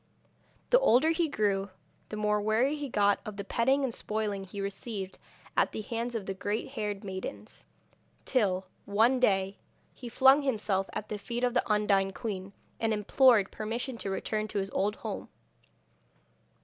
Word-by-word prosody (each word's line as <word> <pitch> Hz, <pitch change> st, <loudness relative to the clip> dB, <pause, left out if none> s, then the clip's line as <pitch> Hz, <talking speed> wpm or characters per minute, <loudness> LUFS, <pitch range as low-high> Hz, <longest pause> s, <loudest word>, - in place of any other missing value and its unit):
The -, -, +7 dB
older 315 Hz, -, +4 dB
he 330 Hz, 0 st, +1 dB
grew 200 Hz, -5 st, 0 dB, 0.4 s
the 215 Hz, -, -5 dB
more 210 Hz, 0 st, +1 dB
weary 225 Hz, +7 st, +2 dB
he 290 Hz, -2 st, -5 dB
got 205 Hz, -3 st, +3 dB
of 215 Hz, -1 st, -7 dB
the 200 Hz, -, -3 dB
petting 265 Hz, +7 st, +2 dB
and 255 Hz, -3 st, -1 dB
spoiling 210 Hz, -3 st, -2 dB
he 195 Hz, +2 st, -8 dB
received 195 Hz, 0 st, -4 dB, 0.4 s
at -, -, +2 dB
the -, -, -3 dB
hands 235 Hz, +2 st, -3 dB
of 215 Hz, -4 st, -3 dB
the 195 Hz, -, -3 dB
green 205 Hz, +3 st, -2 dB
haired 210 Hz, -6 st, -4 dB
maidens, 190 Hz, -1 st, -7 dB, 0.6 s
till, 195 Hz, -7 st, +1 dB, 0.2 s
one 225 Hz, +6 st, +3 dB
day, 195 Hz, -4 st, +2 dB, 0.3 s
he 245 Hz, -, -8 dB
flung 265 Hz, +4 st, +6 dB
himself 210 Hz, -7 st, 0 dB
at 215 Hz, -, -5 dB
the 210 Hz, -, -4 dB
feet 240 Hz, +4 st, -4 dB
of 245 Hz, -1 st, +2 dB
the 235 Hz, -, +1 dB
Undine 200 Hz, -2 st, +2 dB
queen, 195 Hz, -5 st, -5 dB, 0.3 s
and 225 Hz, -1 st, +1 dB
implored 210 Hz, 0 st, +4 dB
permission 235 Hz, +4 st, -3 dB
to 195 Hz, -, -3 dB
return 215 Hz, +2 st, -2 dB
to 210 Hz, -, -5 dB
his 195 Hz, 0 st, -1 dB
old 205 Hz, +2 st, 0 dB
home. -, -, -6 dB
215 Hz, 165 wpm, -30 LUFS, 200-240 Hz, 0.6 s, The